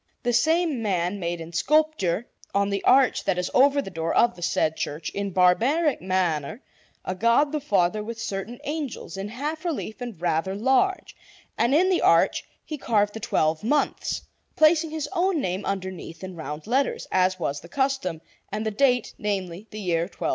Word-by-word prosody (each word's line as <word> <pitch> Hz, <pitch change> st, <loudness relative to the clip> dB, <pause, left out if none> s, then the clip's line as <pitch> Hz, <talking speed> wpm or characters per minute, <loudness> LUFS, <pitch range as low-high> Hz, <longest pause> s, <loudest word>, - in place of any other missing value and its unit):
The 245 Hz, -1 st, +1 dB
same 315 Hz, +1 st, +2 dB
man 190 Hz, -2 st, -1 dB
made 170 Hz, -1 st, -3 dB
in 165 Hz, +1 st, -9 dB
sculpture, 240 Hz, -, +1 dB, 0.3 s
on 200 Hz, 0 st, +2 dB
the 200 Hz, -1 st, -2 dB
arch 265 Hz, -1 st, +4 dB
that 190 Hz, -2 st, +1 dB
is 180 Hz, 0 st, -2 dB
over 280 Hz, +2 st, +4 dB
the 195 Hz, -, -8 dB
door 165 Hz, -1 st, -2 dB
of 235 Hz, 0 st, +4 dB
the 175 Hz, -, -13 dB
said 160 Hz, -2 st, +1 dB
church, 150 Hz, +1 st, -4 dB
in 200 Hz, 0 st, -3 dB
barbaric 235 Hz, -, +3 dB
manner, 185 Hz, -, -1 dB, 0.4 s
a 185 Hz, -, -2 dB
God 235 Hz, +9 st, +3 dB
the 305 Hz, -, -1 dB
Father 205 Hz, -7 st, +1 dB
with 230 Hz, +1 st, -6 dB
certain 225 Hz, +1 st, -4 dB
angels, 295 Hz, -8 st, -4 dB
in 195 Hz, +1 st, -4 dB
half 295 Hz, +9 st, -4 dB
relief 285 Hz, -9 st, -4 dB
and 235 Hz, -8 st, -6 dB
rather 175 Hz, +2 st, 0 dB
large; 265 Hz, -, +1 dB, 0.4 s
and 240 Hz, +4 st, +2 dB
in 365 Hz, +4 st, +4 dB
the 370 Hz, -, +2 dB
arch -, -, +4 dB, 0.2 s
he 305 Hz, -2 st, -6 dB
carved 205 Hz, -4 st, +1 dB
the 225 Hz, -, -6 dB
twelve 155 Hz, -7 st, 0 dB
months, 290 Hz, +6 st, 0 dB, 0.3 s
placing 310 Hz, +1 st, +4 dB
his 310 Hz, -1 st, -3 dB
own 360 Hz, -1 st, +1 dB
name 185 Hz, -4 st, -2 dB
underneath 190 Hz, -3 st, -5 dB
in 185 Hz, -1 st, -7 dB
round 155 Hz, -2 st, -6 dB
letters, 265 Hz, +5 st, 0 dB
as 185 Hz, 0 st, +2 dB
was 145 Hz, -4 st, -2 dB
the 170 Hz, -, -13 dB
custom, 265 Hz, -, -1 dB, 0.3 s
and 215 Hz, +2 st, -3 dB
the 220 Hz, -, 0 dB
date 245 Hz, +1 st, +2 dB
namely, 195 Hz, -1 st, -3 dB
the 215 Hz, -, -8 dB
year 170 Hz, -4 st, 0 dB
1216. 195 Hz, -, -4 dB
210 Hz, 185 wpm, -25 LUFS, 180-275 Hz, 0.4 s, arch